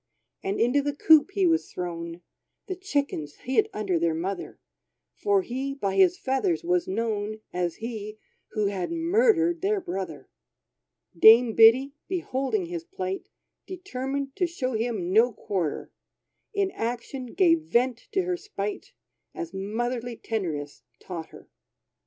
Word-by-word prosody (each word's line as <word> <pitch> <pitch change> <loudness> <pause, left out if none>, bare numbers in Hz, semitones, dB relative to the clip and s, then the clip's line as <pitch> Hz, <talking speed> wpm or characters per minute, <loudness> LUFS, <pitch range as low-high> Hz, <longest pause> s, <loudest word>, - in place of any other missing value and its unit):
And 195 +1 -2
into 245 +5 +3
the 290 0 -2
coop 315 +2 +6
he 390 -2 +2
was 330 -1 +2
thrown: 170 -1 -5 0.4
The 375 - -4
chickens 285 - -2
hid 335 - +1
under 195 -5 -1
their 165 -1 +1
mother, 190 +4 -4 0.5
For 405 -2 +1
he, 270 0 -3
by 200 -8 -1
his 365 -1 +5
feathers 330 +5 0
was 355 0 +1
known 215 0 -2
As 175 -2 -1
he, 220 -2 -6 0.4
who 215 -1 +1
had 200 - -2
murdered 345 0 +3
their 405 +2 +1
brother 190 - -5 0.9
Dame 225 +1 +8
Biddy, 250 +6 +6
beholding 350 0 -1
his 340 -1 -5
plight, 190 - -5 0.4
Determined 275 -7 -4
to 360 -2 +2
show 260 -7 -3
him 220 -6 -1
no 230 +4 +5
quarter, 180 -8 -3 0.6
In 400 -2 0
action 245 +1 -4
gave 335 -4 +5
vent 250 -5 0
to 380 - +2
her 360 0 -1
spite; 210 - -5 0.4
As 170 +2 -5
motherly 235 +5 -3
tenderness 160 -12 -4 0.2
taught 170 -3 -6
her. - - -15
245 Hz, 135 wpm, -26 LUFS, -, 0.9 s, Dame